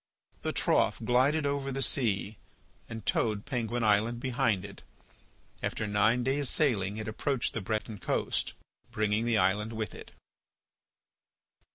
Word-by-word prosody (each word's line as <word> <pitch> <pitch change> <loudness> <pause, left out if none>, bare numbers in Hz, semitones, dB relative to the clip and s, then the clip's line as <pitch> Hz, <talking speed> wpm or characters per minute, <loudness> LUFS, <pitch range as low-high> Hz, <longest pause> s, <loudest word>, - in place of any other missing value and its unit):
The - - -1
trough - - +2
glided 140 +5 +3
over 140 -1 -1
the 135 +1 0
sea 105 -6 0 0.5
and 110 -3 -7
towed 105 -2 0
Penguin 120 -2 -2
Island 110 +3 +2
behind 120 -7 0
it; 100 - -11 0.8
after 110 - -2
nine 110 +4 +2
days' 135 +1 +2
sailing 105 -9 +1
it 110 - -5
approached 125 +3 -1
the 110 - -3
Breton 110 +1 -3
coast, - - -1 0.4
bringing 110 -1 0
the 120 -2 +2
island 105 +3 +1
with 110 -3 -4
it. - - -10
115 Hz, 135 wpm, -30 LUFS, 105-130 Hz, 0.8 s, glided